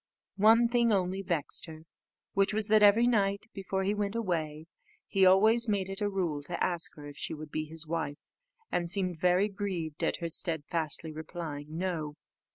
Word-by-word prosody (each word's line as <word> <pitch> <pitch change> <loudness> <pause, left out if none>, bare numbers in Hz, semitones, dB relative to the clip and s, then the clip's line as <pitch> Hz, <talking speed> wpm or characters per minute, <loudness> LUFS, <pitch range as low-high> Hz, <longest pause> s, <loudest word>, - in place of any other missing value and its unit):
One 225 +3 +6
thing 235 -1 +2
only 190 -1 0
vexed 170 -5 -1
her, 160 -1 -10 0.5
which 195 +1 +2
was 215 -1 +2
that 215 0 +5
every 210 +3 +6
night 200 -3 +1
before 190 -1 -3
he 200 +2 +1
went 205 0 -2
away, 160 -8 -2 0.4
he 190 -1 +3
always 220 +5 +5
made 195 -2 0
it 195 +2 -6
a 205 - +1
rule 175 -7 -2
to 170 +4 -3
ask 175 -2 -1
her 150 - -11
if 145 0 -10
she - - -4
would 155 0 -9
be 155 - -2
his 160 +1 -6
wife, 160 -3 -3 0.5
and 170 -1 0
seemed 180 -3 0
very 180 +3 +3
much 200 -2 -15
grieved 175 -7 -3
at - - +1
her 170 - -4
steadfastly 160 -1 -2
replying 155 -1 -7
"No." 165 -5 -3
180 Hz, 185 wpm, -30 LUFS, 160-205 Hz, 0.5 s, One